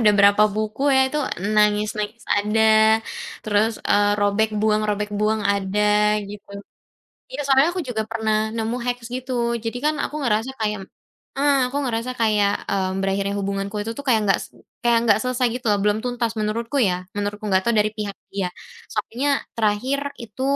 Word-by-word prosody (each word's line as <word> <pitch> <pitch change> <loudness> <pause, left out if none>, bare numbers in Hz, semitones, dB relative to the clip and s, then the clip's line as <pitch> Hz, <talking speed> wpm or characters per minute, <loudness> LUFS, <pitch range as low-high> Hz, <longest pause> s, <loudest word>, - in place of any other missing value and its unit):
udah 210 -2 +5
berapa 200 +1 +6
buku 215 +3 -3
ya? 265 - +5
Itu 300 - -2 0.4
nangis-nangis 210 +1 +1
ada, 210 +2 +1 0.8
terus, 215 +1 +1
eee, 205 0 +3
robek 205 +1 +2
buang 215 0 +2
robek 210 0 -1
buang 210 +1 0
ada 200 0 0 0.5
gitu. 205 0 -10 0.8
Iya - - -6
soalnya 270 +3 +4
aku 365 - -2
juga 220 -3 -1
pernah 220 0 -1 0.2
nemu 225 +1 -1
hacks 245 -1 -3
gitu, 255 0 -4 0.2
jadi 230 +1 -4
kan 305 0 +2
aku - - -7
ngerasa 225 -1 0
kayak 210 -1 -1 0.6
heeh, 285 0 +3
aku 275 - -3
ngerasa 235 0 -2
kayak, 210 -2 +3 0.2
mmm, 190 -1 -1
berakhirnya 195 +1 -1
hubunganku 200 +1 -3
itu 225 +2 -4
tu - - -4
kayak 225 -4 +4
nggak 195 - +3
st - - -13 0.3
kayak 240 -2 +3
nggak 210 -2 +4
selesai 255 0 +1
gitu 250 0 -6
loh, 205 - +3
belum 210 0 +2
tuntas 240 -2 -1
menurutku 230 +5 -2
ya, 180 -4 0
menurutku, 205 +1 -3
nggak 190 -1 +3
tahu 235 - +2
dari 210 0 +3
pihak 205 -2 -3 0.2
dia. 195 -2 -1 0.4
Soalnya 275 +4 0 0.2
terakhir 225 +6 +1 0.2
itu 230 +1 -9
215 Hz, 170 wpm, -22 LUFS, 205-235 Hz, 0.8 s, berapa